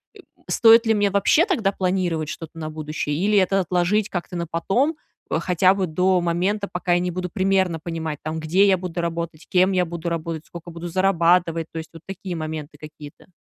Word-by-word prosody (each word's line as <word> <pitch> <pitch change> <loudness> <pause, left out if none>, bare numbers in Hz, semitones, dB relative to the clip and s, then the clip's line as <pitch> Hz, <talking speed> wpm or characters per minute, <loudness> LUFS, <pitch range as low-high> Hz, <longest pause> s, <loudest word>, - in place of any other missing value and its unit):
э, - - -15 0.3
стоит 230 +1 +6
ли 225 - +3
мне 205 -1 +2
вообще 200 - +3
тогда 235 - +1
планировать 180 -5 -1
что-то 165 0 -8
на 155 -1 -4
будущее 155 -1 -4
или 205 +6 +2
это 195 +1 +2
отложить 180 +4 +1
как-то 180 0 -5
на 170 -1 -2
потом, 240 - 0 0.3
э, - - +1
хотя 180 +2 +3
бы 195 -2 -1
до 180 +3 +2
момента, 185 +5 0
пока 180 0 0
я 175 - +3
не 180 0 -2
буду 180 +1 -4
примерно 190 -3 +1
понимать, 160 -2 -5
там: 155 +1 -3
где 180 +6 +3
я 190 -1 +4
буду 180 -1 -5
работать, 170 -1 -4
кем 185 +1 +3
я 180 -1 +2
буду 170 0 -5
работать, 165 -1 -4
сколько 170 0 -10
буду 170 +1 -7
зарабатывать. 170 -2 +2
То - - -8
есть, 160 -1 -9
вот 165 - -12
такие 190 -1 -6
моменты 155 -2 -6
какие-то. 150 -1 -12
175 Hz, 200 wpm, -22 LUFS, 165-190 Hz, 0.3 s, стоит